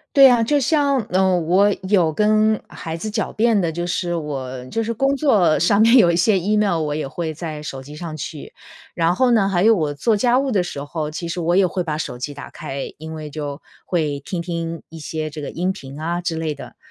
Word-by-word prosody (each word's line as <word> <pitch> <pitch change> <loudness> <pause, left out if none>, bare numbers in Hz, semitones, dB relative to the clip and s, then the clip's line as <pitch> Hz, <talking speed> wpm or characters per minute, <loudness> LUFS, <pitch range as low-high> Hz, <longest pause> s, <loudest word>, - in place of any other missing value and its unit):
对 275 -1 +9
啊， 240 -2 +4
就 285 +5 +2
像， 280 -1 +2
呃， 185 0 +3
我 190 +5 +3
有 175 -6 +3
跟 215 +2 +2
孩 165 -1 -6
子 215 +6 -5
狡 215 0 -2
辩 225 -2 +2
的， 170 -2 0
就 175 +2 -3
是 175 0 -2
我 130 -5 -4
就 225 - -2
是 230 +1 -2
工 275 +4 +1
作 205 - +3
上 190 +7 +3
面 230 +3 +6
有 205 -8 +7
一 - - 0
些 190 +3 +3
Email 200 -2 +1
我 150 -1 -2
也 155 -3 -3
会 160 +2 -4
在 155 -2 -6
手 135 -3 -6
机 145 +3 -11
上 160 -1 -6
去。 150 +1 -7 0.4
然 165 0 +2
后 255 -2 +3
呢， 200 -4 +3
还 180 -1 +1
有 225 +1 +6
我 155 -7 -1
做 215 +9 +1
家 245 +4 +3
务 270 -1 0
的 195 -4 +2
时 175 -5 -6
候， 150 0 -4
其 170 +2 -5
实 170 +1 -3
我 175 +2 +1
也 195 -1 +5
会 180 0 -2
把 155 -2 -3
手 125 - -4
机 135 +4 -5
打 145 - -9
开。 135 0 -6
因 160 +1 -7
为 155 -1 -6
就 145 -1 -6 0.2
会 150 -5 -1
听 170 +5 -4
听 165 -1 -4
一 160 -1 -10
些 155 +1 -4
这 150 0 -7
个 - - -5
音 180 +3 -1
频 135 -3 -10
啊 170 +2 -2
之 170 -2 -2
类 160 -2 -2
的。 140 - -11
170 Hz, 270 characters per minute, -21 LUFS, 155-210 Hz, 0.4 s, 对